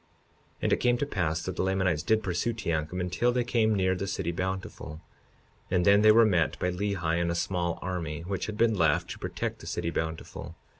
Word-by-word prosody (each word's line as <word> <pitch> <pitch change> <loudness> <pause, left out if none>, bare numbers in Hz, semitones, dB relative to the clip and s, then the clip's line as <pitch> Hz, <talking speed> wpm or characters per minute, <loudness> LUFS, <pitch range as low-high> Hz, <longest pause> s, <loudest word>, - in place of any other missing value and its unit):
52:27 - - -37
And - - +3
it - - +3
came 120 0 +3
to 145 - -1
pass 85 - -1
that 95 - -4
the - - +1
Lamanites 95 -4 +1
did 110 +6 +1
pursue 95 +5 -1
Teancum 85 -4 -2
until 90 +7 +1
they 125 0 +1
came 115 -3 +2
near 95 -1 +2
the 95 +1 -3
city 95 -3 -2
Bountiful, 90 -3 -4 0.7
and 90 -2 +2
then 100 +1 +6
they 110 0 +7
were 115 +1 +6
met 90 -7 +2
by 90 - 0
Lehi 90 -3 -1
and 85 - 0
a 85 - -1
small 85 -1 -1
army, 85 -4 -3
which 95 +3 -3
had 110 -1 -5
been 115 0 +3
left 85 -4 +2
to - - -7
protect - - -4
the - - -11
city 85 - -2
Bountiful. 80 0 -5
95 Hz, 215 wpm, -28 LUFS, 85-105 Hz, 0.7 s, they